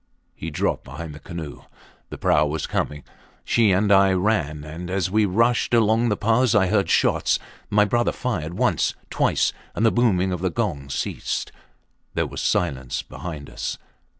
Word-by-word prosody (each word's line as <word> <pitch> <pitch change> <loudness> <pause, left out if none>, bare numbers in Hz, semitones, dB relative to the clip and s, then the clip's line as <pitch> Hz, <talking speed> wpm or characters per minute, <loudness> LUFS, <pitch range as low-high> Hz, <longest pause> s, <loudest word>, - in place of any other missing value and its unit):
He 80 - -6
dropped 75 - -1
behind 85 -2 -8
the 75 - -10
canoe. 80 -5 -7 0.5
The - - -7
prau 75 0 +3
was 80 +2 -2
coming. 75 -1 -2 0.4
She 115 -3 +3
and 100 +2 +2
I 95 -1 +6
ran, 90 -7 0
and 80 +4 -7
as 95 -1 -1
we 110 +1 +3
rushed 115 +5 +2
along 115 +1 +3
the 105 - 0
path 115 +3 +2
I 95 -3 +4
heard 100 -1 +2
shots. - - +3 0.3
My 105 0 +4
brother 120 +3 +1
fired 90 -10 -3
once - - +1 0.2
twice - - +1 0.2
and 110 - +1
the 110 - +5
booming 95 -6 +2
of 90 -2 -3
the 95 - +1
gong 85 -10 -2
ceased. 70 - -3 0.6
There - - +1
was - - -6
silence 65 -7 -1
behind 75 -5 -7
us. - - -4
95 Hz, 170 wpm, -23 LUFS, 80-110 Hz, 0.6 s, I